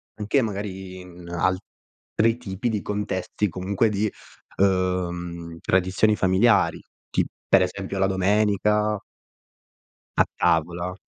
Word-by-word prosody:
anche 110 +6 +1
magari 95 -4 -5
in 90 -1 -12
altri 95 +5 -1
tipi 105 0 -3
di 105 -3 -1
contesti, 105 0 -2
comunque 95 +5 0
di, 105 +1 0 0.5
ehm, 90 -3 0
tradizioni 95 +4 +2
familiari, 95 +4 +3 0.3
tip - - +1 0.2
per 95 - +6
esempio 95 +1 -4
la 95 - +3
domenica. 105 +2 +2 1.2
A - - +6 0.2
tavola. 85 +3 +1
95 Hz, 105 wpm, -24 LUFS, 90-105 Hz, 1.2 s, per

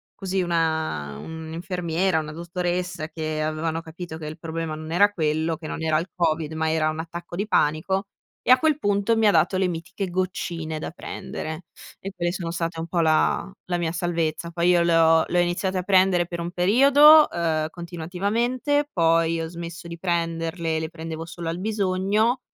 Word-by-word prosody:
così 190 -1 -1
una 160 - -1
un'infermiera, 165 - -2
una 155 0 -5
dottoressa 175 0 -3
che 155 -1 -3
avevano 155 +1 -2
capito 165 0 -8
che 155 - -7
il 155 +2 -7
problema 165 -1 -4
non 155 +1 -8
era 200 +5 +4
quello, 160 -2 0
che 160 - -11
non - - -5
era 160 -1 +2
il 165 +3 -2
covid, 160 -2 0
ma 160 0 0
era 155 -1 +2
un 155 0 -4
attacco 170 +1 -7
di 200 +4 -2
panico 190 +3 +1 0.4
e - - +3
a 255 - +9
quel 310 -1 +2
punto 205 +2 +1
mi 220 - +4
ha 205 - +6
dato 190 - +3
le 185 -1 +2
mitiche 175 +3 -4
goccine 170 -3 -3
da - - -4
prendere 160 -1 -6 0.3
e 195 - -6
quelle 175 -1 -1
sono 175 -2 -4
state 165 -1 -3
un 165 - -4
po' 175 - -1
la 160 +4 +2
la 175 -1 -1
mia 170 -2 -1
salvezza. 170 -1 -2
Poi 170 +1 +1
io 175 -1 +5
le 170 -1 +3
ho 165 0 +5
le 180 - +1
ho - - +6
iniziate 185 +2 -1
a - - -3
prendere 185 -2 +3
per 170 -1 -5
un 170 +1 -4
periodo, 280 - +7
uhm, 160 -2 0
continuativamente, 205 - -1
poi 165 -1 +2
ho 165 - -3
smesso 170 0 -8
di 170 - -7
prenderle, 165 -1 -1
le 160 0 -4
prendevo 160 -1 -6
solo 170 0 -6
al 170 +2 -3
bisogno, 210 +3 +1
170 Hz, 190 wpm, -24 LUFS, 160-185 Hz, 0.4 s, a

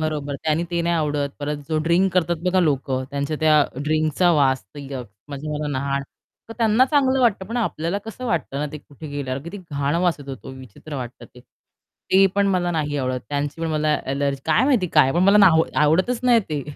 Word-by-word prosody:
बरोबर. 150 -2 -2
त्यानी 160 +2 +1
ते 170 0 0
नाही 170 0 +1
आवडत 145 -2 -1
परत 150 +1 -2
जो 155 -1 0
ड्रिंक 175 +3 +2
करतात 175 -1 +1
बघा 185 0 +3
लोकं 135 -4 0
त्यांच्या 140 +2 -2
त्या 155 -2 +5 0.2
ड्रिंकचा 155 +3 +2
वास 135 - +2
यक्स 135 -6 -7 0.2
म्हणजे 145 +2 -6
मला 150 0 -3
नाय 140 0 -1 0.5
तर - - -6
त्यांना 225 +2 +4
चांगलं 265 -2 +2
वाटतं 205 -6 +2
पण 230 +3 -5
आपल्याला 185 -4 -1
कसं 225 +3 -8
वाटतं 155 -8 -2
ना, 150 - -1
ते 150 - -6
कुठे 145 +2 -12
गेल्यावर 140 -2 -4
किती 180 +5 -8
घाण 140 +1 -1
वास 175 -2 +2
येतो 135 -1 -8
विचित्र 130 +3 -11
वाटतं 125 -1 -7
ते, 125 - -14
ते 195 +9 -1
पण 200 0 +2
मला 180 -2 +1
नाही 150 -3 -1
आवडत. 130 -1 -2
त्यांची 145 +2 -3
पण 165 - -1
मला 155 -1 +1
ॲलर्जी 140 0 -1
काय 160 +10 +3
माहिती 255 -9 +2
काय 135 -3 +5
पण 175 - +2
मला 200 +2 +5
ना 195 -2 +8 0.3
आवडतच 185 +11 +2
नाही 240 -2 +5
ते. 145 -2 -2
155 Hz, 200 wpm, -22 LUFS, 140-185 Hz, 0.5 s, ना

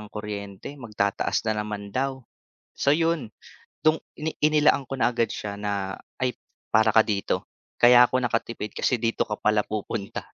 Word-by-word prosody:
ng 105 - -9
kuryente, 105 +3 -6
magtataas 105 -4 -1
na 105 -1 0
naman 100 -1 -6
daw. 135 0 -1 0.6
So, 140 - +3
'yon, 165 -7 0 0.6
'tong 155 0 +5 0.2
ini 155 +1 -3
inilaan 150 -2 +4
ko - - -2
na 120 - +2
agad 115 -2 +1
siya 100 -1 -5
na, 100 -2 -2 0.2
"Ay, 125 -1 0 0.4
para 110 0 +5
ka 110 - +8
dito. 100 -2 -1 0.3
Kaya 120 0 +8
ako 130 - +1
nakatipid 115 -2 -2
kasi 125 - +1
dito 115 0 +1
ka 105 - -2
pala 105 0 +3
pupunta." 105 -1 -4
110 Hz, 160 wpm, -25 LUFS, 105-130 Hz, 0.6 s, ka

